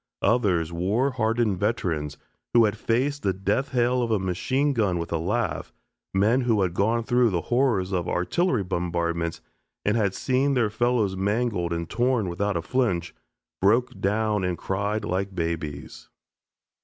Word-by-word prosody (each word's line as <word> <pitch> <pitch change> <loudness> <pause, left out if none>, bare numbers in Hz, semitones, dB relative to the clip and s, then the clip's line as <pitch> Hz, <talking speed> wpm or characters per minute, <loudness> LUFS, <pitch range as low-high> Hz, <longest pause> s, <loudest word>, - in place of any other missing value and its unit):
Others, 95 -7 +2
war 105 +11 +1
hardened 115 -5 0
veterans, 85 -9 -1 0.4
who 115 -1 +7
had 105 0 0
faced 130 +6 0
the 95 - +1
death 100 +8 -1
hail 125 0 +1
of 120 - -1
a 110 - +2
machine 130 +10 0
gun 105 -8 +1
with 85 - -4
a 85 - 0
laugh, 95 -2 -2 0.4
men 110 +7 +3
who 115 -5 +2
had 90 -2 -1
gone 115 +5 +1
through 120 0 +3
the 90 -4 -1
horrors 115 -8 +2
of 90 -2 -1
artillery 125 - +1
bombardments 85 -2 -2 0.4
and 105 - +2
had 100 -4 +1
seen 135 +2 +1
their 115 -4 +2
fellows 110 -3 +1
mangled 100 -2 0
and 85 -1 -2
torn 120 -1 +1
without 100 +2 -1
a 85 - -3
flinch, 115 -5 0 0.5
broke 115 +6 +2
down 105 0 +1
and 90 -1 -1
cried 100 +3 -2
like 95 +3 -2
babies. 80 -4 -4
100 Hz, 155 wpm, -25 LUFS, 90-120 Hz, 0.5 s, who